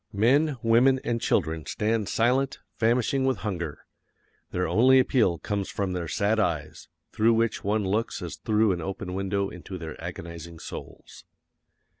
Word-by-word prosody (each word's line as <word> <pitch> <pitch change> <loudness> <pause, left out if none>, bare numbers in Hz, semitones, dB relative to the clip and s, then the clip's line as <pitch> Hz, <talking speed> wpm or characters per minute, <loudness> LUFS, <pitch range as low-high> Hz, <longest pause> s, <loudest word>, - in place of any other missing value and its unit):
Men, 135 +8 +3
women, 120 +4 +4
and 115 -1 -1
children 80 -1 0
stand 110 -1 -1
silent, 130 +4 +1 0.2
famishing 120 +4 +2
with 130 -3 +1
hunger. 85 -8 -4 0.6
Their 90 0 -1
only 130 +4 +5
appeal 120 -9 +3
comes 100 +5 -3
from 100 -2 -2
their 85 -2 -3
sad 105 +8 +1
eyes, 80 -5 -2 0.2
through 115 +1 +3
which 115 0 0
one 105 +1 +1
looks 105 +4 -1
as 85 - -6
through 110 -1 +2
an 90 -2 -2
open 95 +1 -5
window 100 +1 -1
into 90 +1 -8
their 80 -3 -8
agonizing 85 0 -7
souls. - - -10
105 Hz, 150 wpm, -26 LUFS, 90-115 Hz, 0.6 s, only